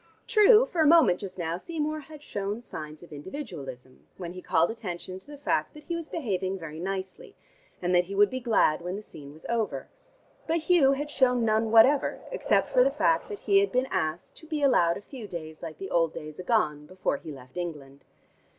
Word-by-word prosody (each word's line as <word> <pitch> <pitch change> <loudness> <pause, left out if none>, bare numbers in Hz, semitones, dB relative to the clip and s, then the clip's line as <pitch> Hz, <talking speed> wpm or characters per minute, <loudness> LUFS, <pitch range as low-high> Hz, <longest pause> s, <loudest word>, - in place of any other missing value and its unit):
True, 450 0 +6
for 345 -8 -1
a 310 - +5
moment 300 - +6
just 190 -2 -7
now 170 -1 -2
Seymour 310 - -3
had 300 0 -12
shown 205 +1 -4
signs 155 -6 -8
of 170 - -13
individualism 145 - -8
when 175 -2 -6
he 185 - -8
called 165 +3 +2
attention 185 -4 -6
to - - -19
the 295 - -9
fact 310 +3 -1
that 300 - -12
he 340 - -3
was 335 -2 -6
behaving 195 - -2
very 160 -3 -8
nicely, 195 - -5 0.5
and 180 +1 +1
that 175 0 +4
he 195 +2 -6
would 205 0 +5
be 255 - -2
glad 220 -11 +2
when 180 +2 -4
the 210 - -7
scene 140 -7 -10
was 155 +2 -16
over, 230 -2 -2 0.6
but 325 +1 +2
Hugh 315 -4 +4
had 290 +2 -4
shown 250 -4 +3
none 220 0 +2
whatever, 230 +6 +5
except - - +1
for - - +5
the - - +3
fact - - +1
that 415 -2 -7
he 395 -1 +4
had 400 - +1
been 255 +1 +1
asked 170 -2 -2
to 320 - -13
be 305 -2 -2
allowed 170 -11 +4
a - - -9
few 235 0 -9
days 160 -4 -8
like 160 -3 -7
the 195 - -7
old 165 -2 +2
days 155 +1 -8
agone 155 -8 0
before 185 -5 -2
he 155 - -9
left 130 -2 -13
England. 145 -6 -6
200 Hz, 215 wpm, -27 LUFS, -, 0.6 s, True